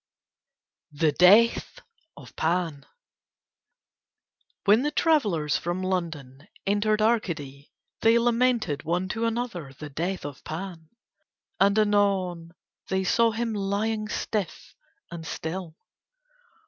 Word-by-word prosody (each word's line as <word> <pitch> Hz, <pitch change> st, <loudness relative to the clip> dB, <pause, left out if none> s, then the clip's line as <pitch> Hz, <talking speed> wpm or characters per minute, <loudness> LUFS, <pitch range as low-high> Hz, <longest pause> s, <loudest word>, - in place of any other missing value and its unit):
THE 150 Hz, +1 st, +2 dB
DEATH 200 Hz, +9 st, +4 dB, 0.4 s
OF -, -, -13 dB
PAN 165 Hz, -3 st, -1 dB, 1.8 s
When 210 Hz, +3 st, +5 dB
the 295 Hz, -, 0 dB
travellers 210 Hz, -, +1 dB
from 175 Hz, +2 st, -3 dB
London 160 Hz, -6 st, -4 dB, 0.2 s
entered 215 Hz, +2 st, +1 dB
Arcady 155 Hz, -, -1 dB, 0.3 s
they 225 Hz, +1 st, +5 dB
lamented 235 Hz, -, +1 dB
one 175 Hz, +4 st, -1 dB
to 230 Hz, +3 st, -1 dB
another 225 Hz, -, -3 dB
the 150 Hz, -1 st, -8 dB
death 175 Hz, +4 st, -3 dB
of 145 Hz, -2 st, -8 dB
Pan. 165 Hz, -1 st, -7 dB, 0.7 s
And 200 Hz, +2 st, +4 dB
anon 195 Hz, -5 st, +1 dB, 0.3 s
they 190 Hz, 0 st, 0 dB
saw 230 Hz, +5 st, +3 dB
him 225 Hz, 0 st, -2 dB
lying 210 Hz, +2 st, -1 dB
stiff 210 Hz, -3 st, -4 dB, 0.4 s
and 170 Hz, -1 st, -7 dB
still. 160 Hz, +1 st, -5 dB
190 Hz, 105 wpm, -26 LUFS, 160-220 Hz, 1.8 s, When